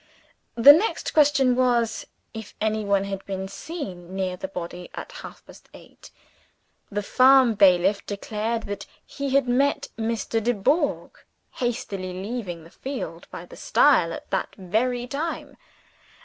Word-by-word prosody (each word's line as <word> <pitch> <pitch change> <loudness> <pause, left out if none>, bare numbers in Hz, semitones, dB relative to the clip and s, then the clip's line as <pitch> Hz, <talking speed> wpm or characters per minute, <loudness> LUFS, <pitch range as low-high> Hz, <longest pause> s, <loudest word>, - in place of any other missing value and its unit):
The 260 +5 +10
next 395 +9 -1
question 280 -4 +4
was 240 -3 +1 0.3
if 220 -2 -9
any 215 0 0
one 200 -1 +1
had 195 -1 -5
been 190 -1 -4
seen 190 - -7
near 185 -1 -2
the 185 - -6
body 180 -1 -7
at - - -7
half - - -11
past - - -17
eight? - - -16 0.8
The 205 0 -3
farm 255 +1 +5
bailiff 195 0 +4
declared 215 +3 -3
that 205 -1 -6 0.2
he 275 -1 -3
had 275 -2 +3
met 280 +3 +1
Mr. 225 0 -1
Dubourg 245 - 0 0.4
hastily 195 -6 -3
leaving 190 -3 -5
the 165 - -16
field 270 +1 -6
by - - -8
the - - -14
stile - - +3
at - - -8
that - - -2
very 235 +6 -1
time. 290 +6 -4
220 Hz, 140 wpm, -24 LUFS, 195-255 Hz, 0.8 s, The